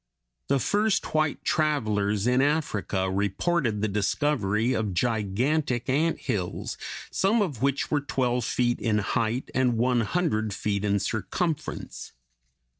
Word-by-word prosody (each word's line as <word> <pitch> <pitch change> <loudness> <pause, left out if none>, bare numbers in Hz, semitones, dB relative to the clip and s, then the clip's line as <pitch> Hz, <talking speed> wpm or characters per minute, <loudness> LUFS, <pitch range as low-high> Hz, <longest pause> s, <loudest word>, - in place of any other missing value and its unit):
The 140 - +3
first 205 - +1
white 155 -2 +1
travelers 105 - +1
in 125 +1 +3
Africa 135 -10 0
reported 105 - 0
the - - +3
discovery 105 +1 +1
of 105 -6 -1
gigantic 120 - 0
ant 155 +5 +1
hills, 100 -10 -3 0.4
some 205 +5 +2
of 145 - -4
which 140 0 0
were 150 -1 +2
twelve 125 -3 0
feet 120 +2 0
in 110 -2 +1
height 115 +4 0
(Fig. - - -18
190) - - 0
and 125 -3 +2
one 120 +1 +2
hundred 110 - 0
feet 100 0 -1
in 100 -1 +2
circumference. 140 - -3
120 Hz, 135 wpm, -26 LUFS, 105-145 Hz, 0.4 s, The